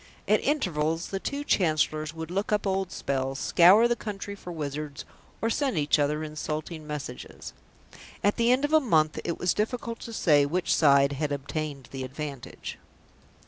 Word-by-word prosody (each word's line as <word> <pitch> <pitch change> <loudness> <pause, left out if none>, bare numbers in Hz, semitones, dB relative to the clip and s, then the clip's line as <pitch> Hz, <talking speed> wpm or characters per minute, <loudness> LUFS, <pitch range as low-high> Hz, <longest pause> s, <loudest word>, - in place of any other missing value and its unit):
At - - +4
intervals 165 - 0
the 195 - -3
two 280 +7 -3
Chancellors 155 - +1
would 160 0 -7
look 200 +4 -2
up 210 0 +1
old 190 -1 -1
spells, 135 0 -2
scour 190 +10 +6
the 240 - +1
country 205 -2 -6
for 185 -3 -9
wizards, 150 -2 -5 0.4
or 225 - +2
send 270 - 0
each 150 0 +2
other 150 +2 +1
insulting 155 +1 -5
messages. 145 -4 -7 0.7
At 205 - +2
the 235 +1 +3
end 260 +3 +3
of 295 - -3
a 315 - +8
month 160 - +2
it 170 - -2
was 180 -2 +1
difficult 230 +2 -2
to 230 - -8
say 150 -9 +4
which 170 +5 0
side 140 -2 +5
had 145 +1 -2
obtained 140 -1 -4
the 135 -1 -5
advantage. 140 0 -7
160 Hz, 170 wpm, -27 LUFS, 150-205 Hz, 0.7 s, a